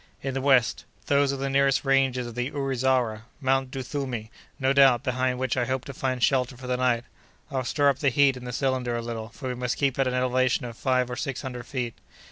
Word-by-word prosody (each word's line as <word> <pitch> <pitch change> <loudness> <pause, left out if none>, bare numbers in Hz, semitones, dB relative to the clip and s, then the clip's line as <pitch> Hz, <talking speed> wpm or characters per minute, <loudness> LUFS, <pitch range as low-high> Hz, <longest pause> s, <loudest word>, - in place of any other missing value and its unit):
"In 135 -1 -2
the 135 - -2
west—those 140 +1 +2
are 140 - -3
the 135 +1 -2
nearest 135 0 +2
ranges 135 -2 +2
of 120 - -7
the 125 +2 -2
Ourizara—Mount 130 -1 0
Duthumi, 130 -4 -4 0.3
no 135 0 +2
doubt, 135 -3 +5
behind 130 -1 0
which 130 -1 -1
I 125 -2 +1
hope 130 +1 -2
to 140 - -7
find 130 -2 -2
shelter 130 -2 +2
for 130 - -10
the 125 0 0
night. 125 -2 +1 0.5
I'll 130 -2 -1
stir 145 +4 +1
up 140 -2 +2
the 140 - +3
heat 135 +1 +4
in 125 - -9
the 125 - -4
cylinder 130 -1 -1
a 120 - -2
little, 115 -1 -5
for 130 +2 -8
we - - -1
must 125 0 -2
keep 140 -2 0
at 135 - +3
an 125 - -1
elevation 125 0 +1
of 120 -1 -7
five 130 0 +1
or - - -3
six 135 0 -4
hundred 125 -2 -6
feet." 125 -4 -3
130 Hz, 225 wpm, -26 LUFS, 125-135 Hz, 0.5 s, doubt